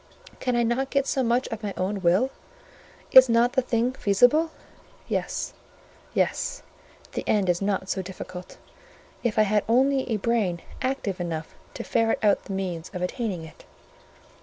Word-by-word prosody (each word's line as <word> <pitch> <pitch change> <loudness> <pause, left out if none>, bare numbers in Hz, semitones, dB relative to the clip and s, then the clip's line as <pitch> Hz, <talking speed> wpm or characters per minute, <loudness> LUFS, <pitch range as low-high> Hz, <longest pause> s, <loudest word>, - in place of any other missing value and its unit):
Can 250 -1 0
I 240 - +3
not 245 +4 0
get 275 -1 +1
so 270 - 0
much 245 +1 +1
of 225 -2 -5
my 205 -2 -4
own 195 +2 -2
will? 190 +10 +3 0.8
Is 260 -1 +9
not 235 +1 +3
the 260 - +3
thing 240 0 0
feasible? 245 +9 +3 0.6
Yes—yes—the - - -2 1.7
end 205 -3 +2
is 175 0 +1
not 195 -1 -1
so 190 0 -1
difficult; 185 -1 -9 0.6
if 235 -3 -1
I 215 - +6
had 210 0 +2
only 265 +3 +3
a 225 - +1
brain 205 -6 0 0.2
active 255 -9 -2
enough 165 -2 -4 0.2
to - - -5
ferret 225 0 +1
out 205 -1 +3
the 195 - -5
means 180 -4 -3
of 180 - -3
attaining 190 -3 -3
it." 160 - -14
215 Hz, 155 wpm, -25 LUFS, 190-245 Hz, 1.7 s, Is